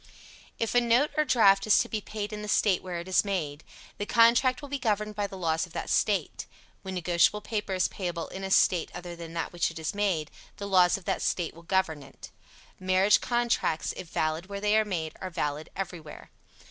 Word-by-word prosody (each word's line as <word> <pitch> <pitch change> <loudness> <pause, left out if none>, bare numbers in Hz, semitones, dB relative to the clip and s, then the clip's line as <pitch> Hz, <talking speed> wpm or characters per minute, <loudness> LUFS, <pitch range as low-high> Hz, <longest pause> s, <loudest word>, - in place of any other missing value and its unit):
If 230 - -1
a 245 - +5
note 240 +5 +3
or 305 - +3
draft 195 -6 +4
is 215 - +6
to - - +2
be 215 - -3
paid 210 0 -5
in 210 - -5
the 210 - -6
State 205 -3 +2
where 180 -2 -5
it 170 - -8
is 185 - +3
made, 165 -7 -3 0.4
the 205 - -3
contract 235 +2 +4
will - - -6
be 280 0 -3
governed 215 -3 -1
by 205 -1 -1
the 195 -1 -9
laws 165 -3 0
of - - -18
that - - -4
State. - - 0 0.3
When 190 -1 -6
negotiable 180 +4 +2
paper 205 -3 -3
is 185 - +2
payable 175 -3 -4
in 190 - -7
a 190 - -3
State 180 -3 +3
other 175 -1 -7
than 165 -1 -9
that 165 - -2
in - - -28
which 175 -1 0
it 165 - -10
is 160 -1 -3
made, 190 -7 -1 0.3
the 200 - -5
laws 185 -2 +4
of 195 - -14
that - - -1
State 175 -3 -1
will 165 - -14
govern 170 -4 0
it. - - -13 0.5
Marriage 185 +2 +3
contracts, 240 -9 0
if 180 - -8
valid 160 +3 -1
where 200 0 -5
they 210 +1 +2
are 220 0 +4
made, 165 -6 -3
are 190 - -4
valid 150 -2 -3
everywhere. 175 -5 -7
190 Hz, 225 wpm, -28 LUFS, 170-210 Hz, 0.5 s, is